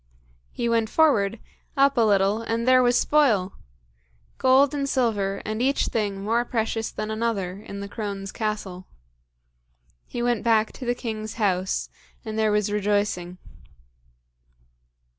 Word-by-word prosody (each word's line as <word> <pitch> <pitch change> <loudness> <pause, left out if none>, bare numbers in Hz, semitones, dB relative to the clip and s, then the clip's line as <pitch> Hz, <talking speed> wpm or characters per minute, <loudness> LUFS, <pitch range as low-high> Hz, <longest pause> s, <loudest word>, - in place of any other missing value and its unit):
He 240 - -2
went 230 -2 +1
forward, 230 -10 +2 0.4
up 275 0 +4
a 240 - +3
little, 205 0 +3
and 230 +1 -2
there 255 0 +6
was 245 0 +3
spoil! 220 -11 +2 0.9
Gold 265 +2 +4
and 280 -1 -2
silver, 205 -7 0
and 215 +2 -3
each 275 +2 +1
thing 200 -3 -2
more 230 +3 +1
precious 225 -1 -2
than 215 - -5
another, 210 -4 -2
in 200 -1 -8
the 200 - -5
crone's 200 -2 -5
castle. 205 -5 -4 1.2
He 240 - -4
went 240 -3 +1
back 225 -2 +2
to 250 - -8
the 245 - +1
king's 220 -3 -5
house, 190 -4 0 0.4
and 220 -1 -5
there 220 -1 +2
was 210 -1 +1
rejoicing. 205 -3 -1
220 Hz, 140 wpm, -24 LUFS, 200-240 Hz, 1.2 s, there